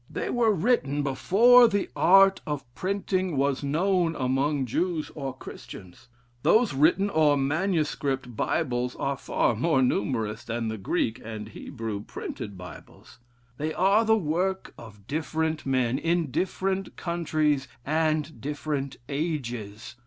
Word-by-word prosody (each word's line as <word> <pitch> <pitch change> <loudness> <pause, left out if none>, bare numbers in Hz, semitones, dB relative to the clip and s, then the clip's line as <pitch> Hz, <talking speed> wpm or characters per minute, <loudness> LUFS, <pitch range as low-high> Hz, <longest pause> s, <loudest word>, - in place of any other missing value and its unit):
They - - -3
were 235 -2 +3
written 165 - +1
before 230 - +6
the 205 -3 0
art 195 +1 +5
of 145 -2 -3
printing 185 -2 -1
was 140 0 +1
known 170 +3 +1
among 135 +2 0
Jews 165 +6 -2
or 135 -3 -4
Christians. 95 -2 -11 0.3
Those 225 - +3
written 160 +8 +3
or 155 -6 +3
manuscript 145 - -1
Bibles 125 -2 -1
are 135 -3 0
more 135 +2 +2
numerous 110 -2 -1
than 115 -1 -3
the 110 -1 -5
Greek 110 +5 -1
and 110 -1 -7
Hebrew 110 -5 -6
printed 100 -1 -7
Bibles. 90 +6 -13 0.4
They 155 +1 -2
are 200 +4 +4
the 220 0 +4
work 185 +2 -1
of 105 -4 -13
different 160 +2 -2
men, 130 -1 +1
in 165 -3 0
different 190 +4 -2
countries, 155 -5 0 0.2
and 155 -3 0
different 145 -1 -3
ages. 120 -7 -4
150 Hz, 125 wpm, -26 LUFS, 125-175 Hz, 0.4 s, before